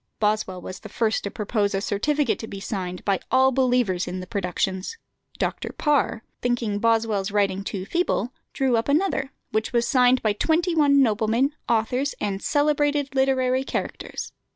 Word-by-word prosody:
Boswell 210 Hz, -3 st, 0 dB
was 185 Hz, +1 st, -8 dB
the 215 Hz, -, -10 dB
first 220 Hz, +1 st, 0 dB
to 200 Hz, -, -2 dB
propose 205 Hz, -1 st, -1 dB
a -, -, +1 dB
certificate 260 Hz, +7 st, 0 dB
to 220 Hz, -, -6 dB
be 195 Hz, -, -7 dB
signed 185 Hz, -3 st, -5 dB
by 195 Hz, -2 st, +2 dB
all 260 Hz, 0 st, +4 dB
believers 245 Hz, -8 st, +1 dB
in 180 Hz, +1 st, -4 dB
the 185 Hz, -, -6 dB
productions. 190 Hz, -, -2 dB, 0.4 s
Dr. -, -, -2 dB
Parr, 285 Hz, -6 st, +1 dB, 0.2 s
thinking 235 Hz, -4 st, 0 dB
Boswell's 225 Hz, -3 st, +1 dB
writing 200 Hz, -1 st, +1 dB
too 195 Hz, -2 st, -4 dB
feeble, 265 Hz, -, 0 dB, 0.2 s
drew 260 Hz, -3 st, +1 dB
up 230 Hz, -, -1 dB
another, 285 Hz, -3 st, +1 dB, 0.2 s
which 220 Hz, +1 st, -1 dB
was 235 Hz, 0 st, +2 dB
signed 250 Hz, -1 st, +4 dB
by 215 Hz, -2 st, +2 dB
twenty 335 Hz, -, +1 dB
one 280 Hz, -3 st, +5 dB
noblemen, 225 Hz, +5 st, +1 dB, 0.2 s
authors, 245 Hz, +5 st, +1 dB
and 200 Hz, -2 st, -2 dB
"celebrated 290 Hz, -1 st, +1 dB
literary 265 Hz, -1 st, +2 dB
characters." -, -, -4 dB
230 Hz, 160 wpm, -24 LUFS, 205-270 Hz, 0.4 s, one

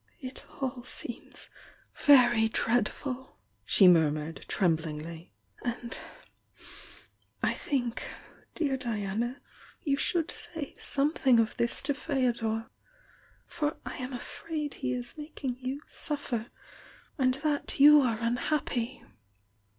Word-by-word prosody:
"It 255 Hz, -2 st, -7 dB, 0.4 s
seems -, -, -7 dB, 0.4 s
tJl -, -, -10 dB
very 240 Hz, -5 st, +7 dB
dreadful!" 245 Hz, +4 st, -1 dB, 0.3 s
she 190 Hz, -, +6 dB
murmured, 160 Hz, -2 st, +3 dB
trem 175 Hz, -5 st, +3 dB
blingly. 160 Hz, +1 st, -7 dB, 0.3 s
"And 240 Hz, 0 st, -2 dB, 1.4 s
I -, -, +3 dB
think, 245 Hz, -4 st, -2 dB, 0.5 s
dear 280 Hz, -5 st, 0 dB
Diac, 225 Hz, +1 st, -1 dB, 0.5 s
you 280 Hz, -2 st, +1 dB
should 330 Hz, +3 st, +1 dB
say 325 Hz, -5 st, -5 dB
something 275 Hz, -4 st, +3 dB
of 225 Hz, -1 st, +1 dB
this 235 Hz, -, +2 dB
to 285 Hz, +1 st, +1 dB
Feodor. 235 Hz, -5 st, -1 dB, 0.7 s
For 310 Hz, -2 st, -2 dB
I -, -, -5 dB
am 255 Hz, 0 st, -4 dB
afraid 300 Hz, +4 st, -4 dB
he 125 Hz, -, -3 dB
is 125 Hz, -, -5 dB
making 275 Hz, -4 st, -5 dB
you 260 Hz, +3 st, -4 dB
suffer, 260 Hz, -6 st, -2 dB, 0.7 s
and 255 Hz, -1 st, +3 dB
that 295 Hz, 0 st, -2 dB
you 295 Hz, +1 st, +9 dB
are 235 Hz, -4 st, +1 dB
unhappy." 240 Hz, 0 st, -1 dB
250 Hz, 110 wpm, -30 LUFS, 220-285 Hz, 1.4 s, you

